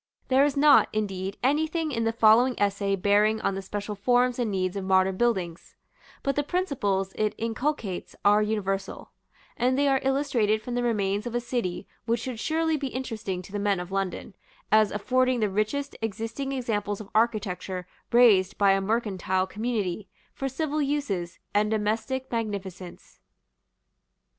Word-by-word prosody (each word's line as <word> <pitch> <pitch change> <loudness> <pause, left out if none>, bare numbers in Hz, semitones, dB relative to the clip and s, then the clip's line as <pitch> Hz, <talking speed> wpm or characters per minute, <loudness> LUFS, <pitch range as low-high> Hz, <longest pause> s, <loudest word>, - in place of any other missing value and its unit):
There 265 +1 +5
is 285 -1 +1
not, 295 +1 +6
indeed, 195 -2 -3
anything 310 +3 +1
in 230 -3 -1
the 225 - +2
following 230 +3 +4
essay 200 -1 +1
bearing 205 +3 +3
on 195 - 0
the 195 - -4
special 205 +2 -5
forms 245 +4 +2
and 235 -3 0
needs 185 -2 -1
of 195 - -3
modern 190 0 +3
buildings; 185 -7 -1 0.5
but 275 -1 0
the 290 - +2
principles 255 - -1
it 215 -1 -1
inculcates 230 -3 -3
are 205 +1 +6
universal; 195 -2 -2 0.4
and 255 +2 +1
they 285 0 +3
are 270 -1 +3
illustrated 265 -6 +1
from 245 +3 -6
the 245 - 0
remains 210 -2 0
of 240 - -5
a - - +2
city 235 -7 -3 0.2
which 230 +1 +1
should 250 -3 -5
surely 320 +3 0
be 280 -1 -3
interesting 220 -8 -4
to 185 - -13
the 205 - -3
men 200 -2 +1
of 180 +1 -7
London, 195 +1 -3 0.4
as 215 -1 +5
affording 255 +4 +1
the 210 -3 0
richest 240 +8 -1
existing 225 +5 -3
examples 215 -6 -2
of 215 - -8
architecture 205 -5 0 0.3
raised 220 -6 +5
by 200 -1 +5
a 195 0 +2
mercantile 190 -3 0
community, 210 -2 -3 0.3
for 270 - -3
civil 305 +2 -2
uses, 245 -12 -2 0.2
and 210 +1 +2
domestic 220 +5 -1
magnificence. 195 -6 -5
215 Hz, 160 wpm, -26 LUFS, 195-255 Hz, 0.5 s, not